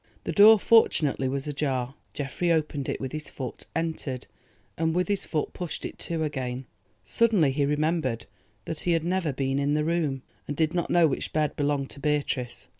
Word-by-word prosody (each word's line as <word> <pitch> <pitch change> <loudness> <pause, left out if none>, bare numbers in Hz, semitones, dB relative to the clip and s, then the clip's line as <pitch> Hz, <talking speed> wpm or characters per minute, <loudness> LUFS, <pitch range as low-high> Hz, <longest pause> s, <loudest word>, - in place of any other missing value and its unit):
The - - -2
door 215 +2 +8
fortunately 155 -11 +3
was 135 +1 -2
ajar. 135 -3 -2 0.2
Geoffrey 145 +5 -1
opened 150 -4 0
it - - -2
with 130 -1 -4
his 155 0 -5
foot, 130 -3 -7
entered, 160 -6 -2 0.5
and 160 0 0
with 180 0 +1
his 200 -2 -1
foot 155 -3 -2
pushed 175 -3 -5
it - - -7
to 165 -2 -2
again. 130 -3 -3 0.4
Suddenly 210 -11 +3
he 140 +1 +1
remembered 150 -5 0 0.4
that 160 - -4
he 175 - +1
had 165 -1 +1
never 175 -2 0
been 135 0 -1
in 145 +1 +1
the 150 0 +1
room, 155 -6 0 0.2
and 145 - -4
did 160 0 +1
not 175 -2 -1
know 175 -1 +5
which 140 - -3
bed 150 -2 +1
belonged 145 -2 -1
to 140 - -10
Beatrice. 140 -5 -1
150 Hz, 190 wpm, -27 LUFS, 135-165 Hz, 0.5 s, door